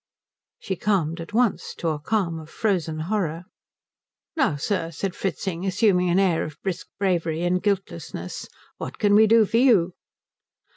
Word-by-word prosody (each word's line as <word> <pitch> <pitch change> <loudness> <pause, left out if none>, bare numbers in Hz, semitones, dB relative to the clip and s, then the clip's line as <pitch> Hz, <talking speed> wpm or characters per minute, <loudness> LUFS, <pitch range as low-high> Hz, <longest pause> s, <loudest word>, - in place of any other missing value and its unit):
She 190 - -4
calmed 170 -4 0
at 165 - -9
once 235 0 +1
to 165 - -2
a 155 -2 -2
calm 170 -1 -1
of 155 -1 -11
frozen 165 -8 -1
horror. 170 -3 -2 0.9
"Now, 270 - +2
sir," 165 +3 -1
said 180 +4 -3
Fritzing, 190 -1 -3
assuming 185 -2 +2
an 175 - +3
air 185 -4 +3
of 155 -2 -7
brisk 190 -3 -3
bravery 170 -4 0
and 180 +1 +1
guiltlessness, 180 - -3 0.3
"what - - -6
can 205 -1 +3
we 215 +1 +7
do 225 0 +6
for 225 - 0
you?" 215 -9 +4
180 Hz, 155 wpm, -24 LUFS, 165-205 Hz, 0.9 s, we